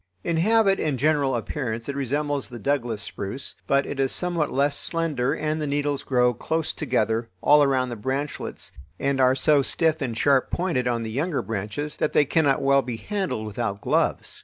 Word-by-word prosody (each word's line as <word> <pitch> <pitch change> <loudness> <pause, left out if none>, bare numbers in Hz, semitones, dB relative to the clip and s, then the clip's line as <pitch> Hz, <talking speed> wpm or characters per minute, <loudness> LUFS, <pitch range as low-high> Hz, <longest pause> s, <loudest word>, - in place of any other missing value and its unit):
In 170 - 0
habit 205 +2 +3
and 150 -4 0
general 145 -1 +2
appearance 115 -1 -3
it 140 - -3
resembles 140 +1 -2
the 120 - -8
Douglas 120 -3 -1
spruce, 105 +8 -5
but 140 0 +3
it 135 - -5
is 135 -1 +2
somewhat 175 -4 0
less 140 +1 +1
slender 150 -7 0
and 155 +1 -2
the 150 - -2
needles 145 0 -1
grow 125 -2 +2
close 160 +7 -2
together 115 -5 0
all 150 +8 +5
around 130 -3 +2
the 120 - -4
branchlets 135 +6 -4 0.3
and 135 -1 +1
are 130 0 +5
so 145 +2 +4
stiff 160 +3 0
and 120 -4 -3
sharp 135 -1 +3
pointed 165 -9 -1
on 120 -1 0
the 110 - -5
younger 145 +6 -1
branches 110 +8 -4
that - - 0
they 145 - +4
cannot 145 -2 +2
well 140 0 +4
be 125 -3 -5
handled 180 - -3
without 105 -1 -3
gloves. - - 0
140 Hz, 185 wpm, -24 LUFS, 125-150 Hz, 0.3 s, all